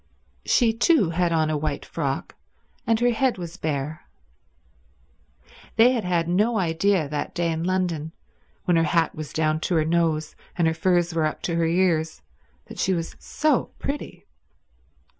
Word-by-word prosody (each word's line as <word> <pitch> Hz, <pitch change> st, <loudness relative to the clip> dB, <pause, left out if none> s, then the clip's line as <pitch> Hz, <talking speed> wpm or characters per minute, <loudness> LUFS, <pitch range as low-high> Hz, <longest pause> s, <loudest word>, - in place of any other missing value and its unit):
She 235 Hz, -3 st, +3 dB
too 230 Hz, -, +3 dB
had 175 Hz, 0 st, +1 dB
on 160 Hz, -1 st, +2 dB
a 155 Hz, -, 0 dB
white 145 Hz, -1 st, -3 dB
frock, 140 Hz, -4 st, -3 dB, 0.5 s
and 225 Hz, -1 st, +3 dB
her 245 Hz, 0 st, +3 dB
head 250 Hz, +1 st, +1 dB
was 170 Hz, -1 st, -7 dB
bare. 155 Hz, -2 st, -4 dB, 1.7 s
They 235 Hz, +3 st, +6 dB
had 240 Hz, -4 st, -1 dB
had 175 Hz, -2 st, 0 dB
no 210 Hz, +6 st, +2 dB
idea 180 Hz, -1 st, +1 dB
that 145 Hz, 0 st, -4 dB
day 170 Hz, -1 st, 0 dB
in 160 Hz, 0 st, -2 dB
London, 175 Hz, -4 st, -1 dB, 0.5 s
when 175 Hz, -2 st, +3 dB
her 165 Hz, -, +3 dB
hat 165 Hz, +1 st, +1 dB
was 155 Hz, -1 st, -7 dB
down 155 Hz, 0 st, 0 dB
to 175 Hz, -, -1 dB
her 155 Hz, -1 st, +2 dB
nose 160 Hz, -2 st, 0 dB, 0.2 s
and 170 Hz, -2 st, +3 dB
her 160 Hz, -, +2 dB
furs 175 Hz, 0 st, +1 dB
were 160 Hz, -2 st, +2 dB
up 155 Hz, -, -6 dB
to 170 Hz, -, -1 dB
her 165 Hz, 0 st, +2 dB
ears, 165 Hz, -2 st, +1 dB, 0.4 s
that -, -, -11 dB
she 190 Hz, -, +2 dB
was 165 Hz, -1 st, -4 dB
so 305 Hz, -4 st, +1 dB
pretty. 285 Hz, +1 st, -5 dB
170 Hz, 165 wpm, -24 LUFS, 155-190 Hz, 1.7 s, They